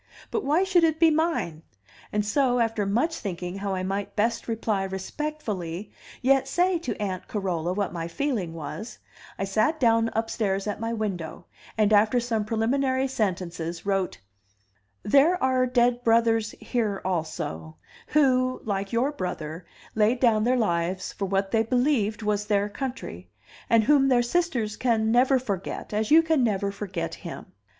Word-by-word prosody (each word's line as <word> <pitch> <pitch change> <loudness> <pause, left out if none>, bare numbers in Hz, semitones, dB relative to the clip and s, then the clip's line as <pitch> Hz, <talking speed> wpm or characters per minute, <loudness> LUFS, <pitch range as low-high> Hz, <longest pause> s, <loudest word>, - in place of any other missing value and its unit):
But 430 - -1
why 310 +6 +2
should 370 -3 +3
it 320 -1 +2
be 330 -1 +6
mine? 310 - 0 0.5
And 210 0 0
so, 250 +3 +2
after 225 -3 0
much 270 +12 +1
thinking 180 -1 -5
how 195 -1 -2
I 185 - -3
might 200 +1 -3
best 230 +2 0
reply 225 -3 -1
respectfully 195 - -4 0.3
yet 270 +1 +3
say 355 +5 +2
to 260 -8 -4
Aunt 190 -3 -3
Carola 180 -5 -2
what 200 0 -2
my 165 -1 -4
feeling 190 - -2
was, 165 +9 -7 0.4
I - - -2
sat 215 +11 +1
down 230 -2 +3
upstairs 210 -3 -1
at 205 - -3
my 225 +1 -2
window, 200 -8 -4 0.3
and, 215 -1 +3
after 215 +4 +4
some 230 -3 -1
preliminary 260 +4 +1
sentences, 175 -7 -3
wrote: 195 -2 0 0.9
"There 285 - +4
are 255 -1 +3
dead 245 0 +2
brothers 225 -1 +2
here 215 -5 -1
also, 120 - -3 0.3
who, 255 -3 +2
like 200 -2 -2
your 245 +5 +1
brother, 170 - -5 0.3
laid 220 +3 +2
down 225 -4 +3
their 255 +1 +3
lives 185 -3 -1
for 195 - -3
what 195 0 0
they 225 - +3
believed 225 -3 +1
was 210 0 0
their 205 -1 +1
country, 260 +4 -6 0.4
and 230 -1 +5
whom 275 +2 +4
their 250 -2 +4
sisters 240 -7 -1
never 240 +3 +3
can 255 - -6
forget 195 0 -4
as 215 +1 0
you 325 +2 +7
can 320 -5 +2
never 200 -3 0
forget 190 -4 -4
him. 170 -3 -9
220 Hz, 160 wpm, -26 LUFS, 195-255 Hz, 0.9 s, you